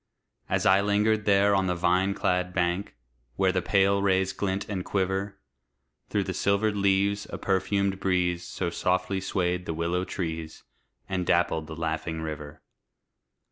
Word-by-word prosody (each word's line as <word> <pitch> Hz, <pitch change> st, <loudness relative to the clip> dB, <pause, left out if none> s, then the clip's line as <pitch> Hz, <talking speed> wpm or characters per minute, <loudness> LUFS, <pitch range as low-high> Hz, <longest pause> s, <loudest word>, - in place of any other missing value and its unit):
As -, -, 0 dB
I 95 Hz, +1 st, +5 dB
lingered 105 Hz, +1 st, +1 dB
there 100 Hz, 0 st, +4 dB
on 95 Hz, -1 st, +2 dB
the 90 Hz, -, 0 dB
vine 90 Hz, +3 st, +1 dB
clad 90 Hz, 0 st, 0 dB
bank, 90 Hz, +2 st, -1 dB, 0.4 s
Where 95 Hz, -1 st, +2 dB
the 95 Hz, -1 st, 0 dB
pale 100 Hz, +1 st, +3 dB
rays 95 Hz, -1 st, +2 dB
glint 100 Hz, 0 st, -2 dB
and 95 Hz, -4 st, -3 dB
quiver 95 Hz, +1 st, -1 dB, 0.7 s
Through -, -, +1 dB
the -, -, -4 dB
silvered 100 Hz, +2 st, +1 dB
leaves, 100 Hz, +1 st, +1 dB
a -, -, -5 dB
perfumed 100 Hz, 0 st, 0 dB
breeze 90 Hz, -2 st, 0 dB
So 85 Hz, -, -3 dB
softly 90 Hz, +2 st, 0 dB
swayed 90 Hz, -1 st, -1 dB
the 80 Hz, -, -2 dB
willow 85 Hz, +2 st, -1 dB
trees, 80 Hz, -4 st, -5 dB, 0.4 s
And 95 Hz, -2 st, -1 dB
dappled 80 Hz, -2 st, +1 dB
the 80 Hz, -, -7 dB
laughing 80 Hz, 0 st, -3 dB
river. 75 Hz, -2 st, -7 dB
95 Hz, 150 wpm, -27 LUFS, 90-100 Hz, 0.7 s, I